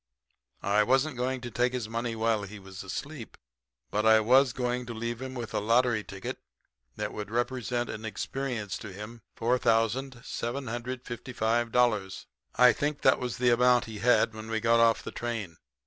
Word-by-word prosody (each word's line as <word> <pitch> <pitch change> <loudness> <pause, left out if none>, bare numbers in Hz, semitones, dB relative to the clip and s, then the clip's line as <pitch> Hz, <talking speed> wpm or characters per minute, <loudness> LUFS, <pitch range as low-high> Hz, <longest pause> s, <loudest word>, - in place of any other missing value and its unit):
I 100 +2 +3
wasn't 135 +6 +2
going 130 +1 -2
to 120 -1 -6
take 125 +2 +1
his 125 -3 -2
money 115 +1 -3
while 110 -1 +1
he 100 +1 -8
was 95 -1 -10
asleep, 120 +6 -7 0.5
but 105 - 0
I 110 0 +6
was 130 +4 +5
going 125 0 -2
to 120 - -5
leave 115 +1 -4
him 130 0 -6
with 120 -2 -5
a - - +1
lottery 115 +1 +2
ticket 95 -1 -6 0.6
that - - -4
would 105 -1 -5
represent 120 +1 -1
in 110 - -6
experience 110 -2 -3
to 105 - -8
him 105 +4 -9 0.2
$4,755 120 -2 0 0.3
I 125 0 +7
think 145 0 -2
that 130 - +4
was 125 -2 -3
the 125 0 +3
amount 125 +1 +4
he 110 -2 -8
had 120 -1 +3
when 110 0 -8
we 110 0 0
got 115 +1 +3
off 115 -1 +4
the - - -6
train. 110 -8 -4
120 Hz, 165 wpm, -29 LUFS, 110-125 Hz, 0.6 s, I